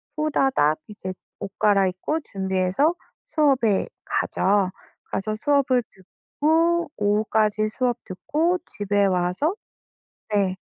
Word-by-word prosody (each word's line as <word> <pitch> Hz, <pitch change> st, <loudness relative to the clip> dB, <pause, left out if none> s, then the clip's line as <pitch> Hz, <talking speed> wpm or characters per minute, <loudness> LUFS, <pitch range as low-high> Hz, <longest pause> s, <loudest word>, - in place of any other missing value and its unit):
후다닥 270 Hz, -, +2 dB
이제 190 Hz, -3 st, -6 dB, 0.3 s
옷 195 Hz, -, -6 dB
갈아입고 195 Hz, -, +2 dB
준비해서 190 Hz, -, 0 dB, 0.3 s
수업에 270 Hz, -10 st, +2 dB, 0.2 s
가죠. 195 Hz, -1 st, +1 dB, 0.4 s
가서 215 Hz, +2 st, -2 dB
수업을 270 Hz, -4 st, +3 dB
듣고 325 Hz, -, 0 dB
오후까지 215 Hz, +1 st, +1 dB
수업 245 Hz, +1 st, -1 dB
듣고 310 Hz, -, 0 dB
집에 205 Hz, 0 st, 0 dB
와서 185 Hz, -, +1 dB, 0.8 s
네. 195 Hz, -2 st, +2 dB
215 Hz, 220 characters per minute, -24 LUFS, 190-290 Hz, 0.8 s, 수업을